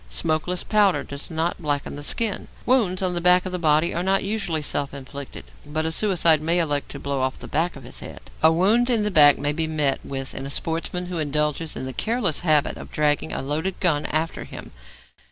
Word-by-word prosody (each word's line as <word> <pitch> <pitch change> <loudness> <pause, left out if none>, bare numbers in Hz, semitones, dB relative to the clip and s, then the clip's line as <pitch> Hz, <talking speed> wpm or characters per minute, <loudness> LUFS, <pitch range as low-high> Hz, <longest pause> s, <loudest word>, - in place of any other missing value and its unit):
Smokeless 165 +2 -1
powder 205 -3 +2
does 140 0 -8
not 165 +1 -2
blacken 145 -2 -2
the 145 - -7
skin. 210 +7 -1 0.2
Wounds 200 -8 +2
on 180 -1 0
the 175 - -1
back 180 +1 +5
of 185 - -4
the 180 - -3
body 155 0 +2
are 170 - -1
not 190 +2 +1
usually 195 -7 -2
self 140 -1 -2
inflicted, 140 0 -8 0.2
but 155 +2 -3
a 160 - -1
suicide 170 -4 +4
may 165 +3 +2
elect 145 -4 0
to - - -8
blow 140 -1 -3
off 130 0 -1
the - - -9
back 165 +4 -1
of - - -11
his - - -8
head. - - -9 0.2
A 160 - +6
wound 210 +9 +2
in 230 -4 +3
the 210 - 0
back 145 -4 +7
may 145 +1 -1
be 160 +1 0
met 150 -3 +1
with 135 -1 -5
in 135 - -5
a - - -6
sportsman 165 +4 -2
who 175 -2 -4
indulges 150 +1 -1
in - - -5
the 130 - -6
careless 220 - 0
habit 155 -4 +1
of - - -10
dragging 150 0 0
a - - -3
loaded 155 +7 -2
gun 155 -6 +1
after 160 +2 -2
him. - - -10
160 Hz, 225 wpm, -23 LUFS, 145-180 Hz, 0.2 s, back